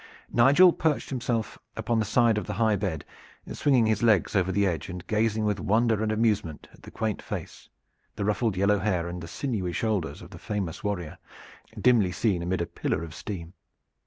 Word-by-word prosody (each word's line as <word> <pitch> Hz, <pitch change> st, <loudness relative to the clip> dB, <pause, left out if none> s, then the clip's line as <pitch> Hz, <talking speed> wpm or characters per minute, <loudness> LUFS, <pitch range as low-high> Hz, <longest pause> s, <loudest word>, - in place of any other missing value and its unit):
Nigel 145 Hz, +9 st, +6 dB
perched 155 Hz, -3 st, -1 dB
himself 120 Hz, -4 st, -2 dB, 0.2 s
upon 115 Hz, -1 st, 0 dB
the 110 Hz, -, +1 dB
side 115 Hz, 0 st, +3 dB
of -, -, -8 dB
the 105 Hz, -, -3 dB
high 110 Hz, 0 st, +2 dB
bed, 90 Hz, -7 st, -3 dB, 0.5 s
swinging 130 Hz, -5 st, +3 dB
his 110 Hz, -1 st, +1 dB
legs 110 Hz, -5 st, +3 dB
over 95 Hz, -1 st, +2 dB
the 100 Hz, +1 st, +2 dB
edge 90 Hz, -2 st, -2 dB
and 90 Hz, -1 st, -7 dB
gazing 110 Hz, 0 st, 0 dB
with 105 Hz, -2 st, 0 dB
wonder 110 Hz, +2 st, +2 dB
and 110 Hz, -1 st, 0 dB
amusement 105 Hz, -8 st, 0 dB
at -, -, -19 dB
the -, -, -11 dB
quaint 110 Hz, -2 st, -3 dB
face, -, -, -7 dB, 0.5 s
the 100 Hz, -, -2 dB
ruffled 105 Hz, -1 st, 0 dB
yellow 100 Hz, +2 st, +3 dB
hair, 90 Hz, -4 st, 0 dB
and 90 Hz, 0 st, -6 dB
the 85 Hz, -, -7 dB
sinewy 100 Hz, -5 st, -3 dB
shoulders 100 Hz, -, -2 dB
of -, -, -13 dB
the -, -, -10 dB
famous 100 Hz, -5 st, -4 dB
warrior, 90 Hz, -7 st, -3 dB, 0.6 s
dimly 115 Hz, -7 st, +4 dB
seen 95 Hz, -2 st, 0 dB
amid 90 Hz, +1 st, -1 dB
a -, -, 0 dB
pillar 80 Hz, -, -3 dB
of 80 Hz, -2 st, -8 dB
steam. 85 Hz, -2 st, -7 dB
105 Hz, 190 wpm, -27 LUFS, 90-115 Hz, 0.6 s, Nigel